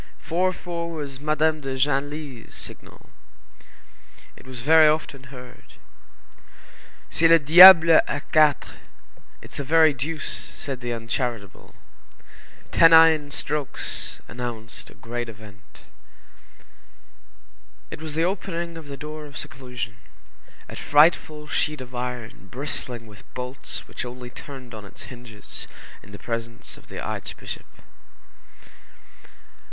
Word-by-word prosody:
Four 185 +3 0
four 170 -2 -5
was 145 -5 -6
Madame 155 +1 +1
de 135 -1 -4
Genlis's 140 -2 -2
signal. - - -10 1.2
It - - -16
was 130 -2 -7
very 155 +3 +6
often 150 -3 -1
heard. 125 -1 -13 1.4
"C'est 165 - +3
le 165 0 +7
diable 165 +2 +10 0.2
a - - -2
quatre,"—it's 155 -3 -1
the 140 - -3
very 160 +2 +5
deuce—said 140 -2 -5
the 120 0 -3
uncharitable. 115 -2 -4 1.0
Tennine 160 -2 +6
strokes 145 -1 -3
announced 120 -2 -6
a - - -16
great 120 0 -5
event. 105 -2 -15 2.1
It - - -8
was 155 -2 -5
the 165 +1 +2
opening 170 -3 -3
of 155 - -12
the 140 -1 -7
door 150 +1 -7
of 140 - -11
seclusion, 125 -4 -6 0.7
a - - -9
frightful 150 0 +3
sheet 150 +1 -1
of 130 0 -10
iron 120 -5 -6
bristling 125 -2 -4
with 105 -1 -16
bolts 125 +1 -5
which - - -6
only 125 0 -8
turned 130 -2 -11
on 110 -1 -8
its 100 - -12
hinges 120 -4 -8 0.3
in 105 - -16
the 105 - -9
presence 115 +1 -5
of - - -18
the - - -8
archbishop. - - -6
135 Hz, 115 wpm, -24 LUFS, 120-155 Hz, 2.1 s, diable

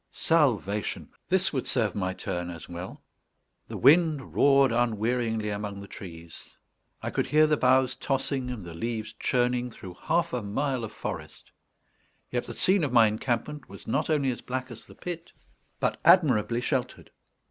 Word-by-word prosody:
Salvation! 115 - +1 0.2
This 190 -2 +3
would 130 - -2
serve 110 -7 +1
my 95 -2 -1
turn 90 -1 -4
as 85 -2 -8
well. 90 +2 -8 0.6
The - - -6
wind 155 -1 +4
roared 140 -2 +5
unwearyingly 115 -1 0
among 100 -1 -4
the 100 - -9
trees; 85 -4 -11 0.5
I - - -2
could - - -1
hear 155 +1 +5
the 155 0 +3
boughs 130 -1 +3
tossing 135 -1 -2
and 115 -7 -6
the 85 - -8
leaves 110 +4 -4
churning 125 0 +1
through 95 -5 -10
half 170 +1 0
a 125 - -1
mile 125 +5 -2
of 110 - -5
forest; - - -7 0.8
yet 120 -1 -2
the - - -7
scene 190 -1 +3
of 145 - 0
my 120 -2 +7
encampment 120 +6 -2
was 100 0 -11
not 140 +8 -1
only 140 -4 +2
as 120 - -6
black 130 0 -4
as 115 -1 -11
the - - -14
pit, 170 -1 -7 0.5
but - - 0
admirably 120 - +4
sheltered. 130 -1 -3
125 Hz, 165 wpm, -27 LUFS, 105-140 Hz, 0.8 s, my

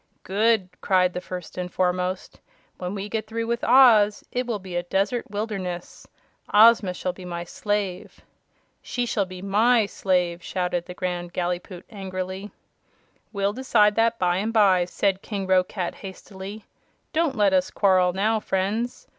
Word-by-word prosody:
"Good!" 210 0 +2
cried 185 -2 +2
the 180 - -4
First 180 -1 -7
and 180 0 -4
Foremost. 180 0 -1 0.4
"When 180 +2 -4
we 200 0 -4
get 215 0 -3
through 230 +1 -3
with 235 +1 -2
Oz 220 -6 +6
it 250 0 -2
will 230 -3 -1
be 190 -2 -9
a 175 - +1
desert 195 +7 -1
wilderness. 200 -4 -5 0.4
Ozma 210 -3 +6
shall 180 0 -3
be 185 - -12
my 175 -1 -5
slave." 200 0 -3 0.6
"She 245 0 -2
shall 205 -4 -1
be 185 0 -9
MY 220 +3 +3
slave!" 180 -3 0
shouted 180 -1 -2
the 180 - -8
Grand 175 -1 -4
Gallipoot, 175 0 -4
angrily. 190 -1 -5 0.8
"We'll 200 -1 -1
decide 220 -4 +3
that 230 +1 +2
by 180 -2 +1
and 215 +4 -1
by," 195 -5 +4
said 195 +1 0
King 200 -3 -4
Roquat 185 -1 +1
hastily. 195 +2 -9 0.5
"Don't 320 -4 +1
let 205 -3 +3
us 185 -1 +2
quarrel 185 -3 +3
now, 215 +4 +1
friends. 210 +5 -2
195 Hz, 155 wpm, -24 LUFS, 180-215 Hz, 0.8 s, Oz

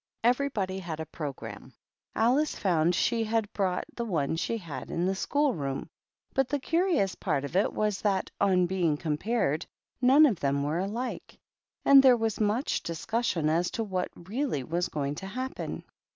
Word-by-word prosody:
Every 250 +4 +3
body 190 -6 -2
had 165 -4 -5
a 160 - -3
programme. 130 -7 -7 0.4
Alice 260 +7 +2
found 175 -2 +2
she 230 +4 +1
had 220 -1 -1
brought 185 -3 0
the 235 - -2
one 160 -9 0
she 185 +7 -1
had 155 - -7
in 170 - -1
the 190 - +1
school 285 +8 +1
room, 135 -4 -4 0.4
but 270 -1 +1
the 290 - +1
curious 325 - +1
part 145 -8 -1
of 140 - -7
it 195 - +3
was 210 -2 -1
that, 195 -3 0
on 185 -3 +4
being 175 -4 +1
compared, 160 +1 -1 0.3
none 270 +5 +7
of 220 - +1
them 140 0 0
were 150 +4 -1
alike, 220 +7 -4 0.5
and 275 -1 +9
there 255 -2 +6
was 225 -2 -1
much 215 +6 +1
discussion 170 0 -1
as 170 +3 +2
to 225 - -2
what 185 -4 -2
really 205 - -2
was 170 +6 -1
going 140 -1 -2
to 190 - -6
happen. 255 +6 -5
190 Hz, 175 wpm, -28 LUFS, 160-235 Hz, 0.5 s, and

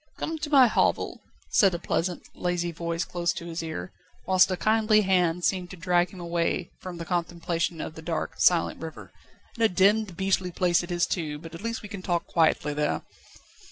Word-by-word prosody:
"Come 320 0 -3
to 300 0 -4
my 275 -3 +7
hovel," 230 - +1 0.3
said 195 -4 +4
a - - -1
pleasant, 175 +1 -2
lazy 175 -1 -1
voice 170 +1 -3
close 175 -1 -1
to 170 - -7
his 165 0 -4
ear, 90 - -5 0.3
whilst 185 0 +5
a 185 - -1
kindly 215 +1 +3
hand 180 -3 +2
seemed 180 -1 0
to 185 - -9
drag 175 0 +2
him 185 - -12
away 170 0 -1
from 180 -2 -7
the 170 - -6
contemplation 170 -1 -2
of 155 - -5
the 160 - -10
dark, 160 -1 -3
silent 175 -2 +3
river. 160 -1 -8 0.4
"And 230 - -2
a 225 - +5
demmed, 195 0 +2
beastly 190 -1 +1
place 175 -1 +2
it 175 - -8
is 175 -1 +1
too, 155 -5 -3
but 165 +2 -11
at 165 - -8
least 230 0 -4
we - - -6
can 200 -2 -7
talk 175 -2 -1
quietly 160 -3 +2
there." 150 0 -1
175 Hz, 200 wpm, -27 LUFS, 165-190 Hz, 0.4 s, my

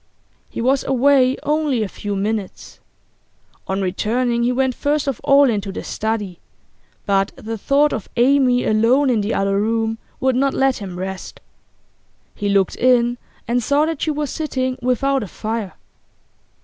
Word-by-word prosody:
He - - -5
was 265 +3 +2
away 265 0 +3
only 295 -6 0
a - - -2
few 205 +1 -5
minutes. 205 0 -4 0.9
On 195 +1 -1
returning 235 +6 0
he 240 +1 +2
went 260 0 +1
first 290 +2 -1
of 270 -5 -2
all 280 0 +5
into 205 -4 -1
the - - -6
study, 210 -5 -3 0.7
but 195 -1 +1
the 225 +1 -6
thought 280 +7 +2
of 220 - -5
Amy 250 0 +3
alone 245 +6 +3
in 225 -3 +1
the 205 +2 -2
other 195 0 +1
room 225 +1 -1 0.2
would 260 -1 +1
not 275 +1 +1
let 270 -1 +2
him 190 -4 -7
rest. 190 +1 -6 0.9
He 205 -1 -3
looked 195 -2 +1
in 245 -1 +3 0.3
and 245 +1 +1
saw 285 +6 +2
that 320 -2 -4
she - - 0
was 300 -1 -2
sitting 260 -5 -2
without 265 +2 +1
a 210 - -5
fire. 215 +1 -4
240 Hz, 160 wpm, -20 LUFS, 210-270 Hz, 0.9 s, all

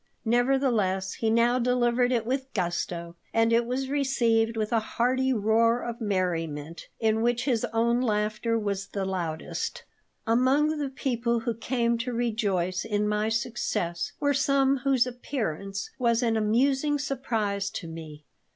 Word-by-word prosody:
Nevertheless, 235 -6 +1
he 225 - -1
now 235 +2 +3
delivered 245 0 +2
it 235 -3 +1
with 265 +2 -2
gusto, 175 -2 -2 0.2
and 225 0 +3
it 235 0 +3
was 260 +2 -2
received 235 -5 +1
with 215 0 -1
a 230 - +4
hearty 255 +4 0
roar 230 +1 +2
of 235 0 -5
merriment, 165 -6 -2
in 220 -1 +2
which 240 +1 +1
his 245 -6 +1
own 235 +2 +2
laughter 215 0 0
was 200 -2 -2
the 200 -1 -3
loudest 175 -4 -3 0.4
Among 270 +6 +2
the 285 -2 -2
people 240 -3 -1
who 235 0 -1
came 235 +1 0
to 245 +1 -3
rejoice 200 -6 0
in 210 -1 0
my 210 +1 0
success 225 -7 -2
were 285 0 +2
some 275 0 +3
whose 265 -2 +2
appearance 200 - -4
was 235 -1 +2
an 230 -1 +2
amusing 265 +7 +2
surprise 225 -8 -2
to 175 - -6
me. 155 -2 -9
230 Hz, 145 wpm, -27 LUFS, 205-250 Hz, 0.4 s, a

